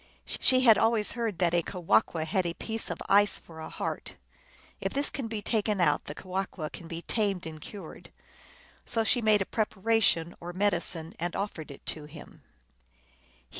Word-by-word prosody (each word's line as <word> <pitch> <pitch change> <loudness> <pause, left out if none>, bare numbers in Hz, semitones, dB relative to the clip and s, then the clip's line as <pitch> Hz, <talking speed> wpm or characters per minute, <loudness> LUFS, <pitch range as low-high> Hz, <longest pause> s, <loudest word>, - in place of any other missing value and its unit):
She 255 0 +6
had 230 -4 +7
always 225 -2 +2
heard 230 -6 -2
that 175 -1 +2
a 175 - +4
Kewahqu 165 - +1
had 185 +4 +1
a 170 - -3
piece 225 0 -3
of - - -3
ice 205 +1 +4
for 160 -1 -13
a 160 - -6
heart. - - -4 0.6
If - - -2
this 280 +1 0
can 265 -5 -4
be 220 -2 -4
taken 210 -2 0
out, 150 -5 +2
the 145 - -7
Kewahqu 185 -3 -4
can 170 - -9
be 165 +1 -6
tamed 200 -6 -1
and 155 -1 -8
cured. 190 -1 -10 0.7
So 225 -1 0
she 245 +2 +2
made 215 -2 +4
a - - -16
preparation 210 -6 +1
or 175 +1 -7
medicine, 185 -3 +1
and 175 0 -2
offered 185 -7 -4
it 140 - -12
to 155 -2 -2
him. 150 0 -12
190 Hz, 175 wpm, -29 LUFS, 165-220 Hz, 0.7 s, had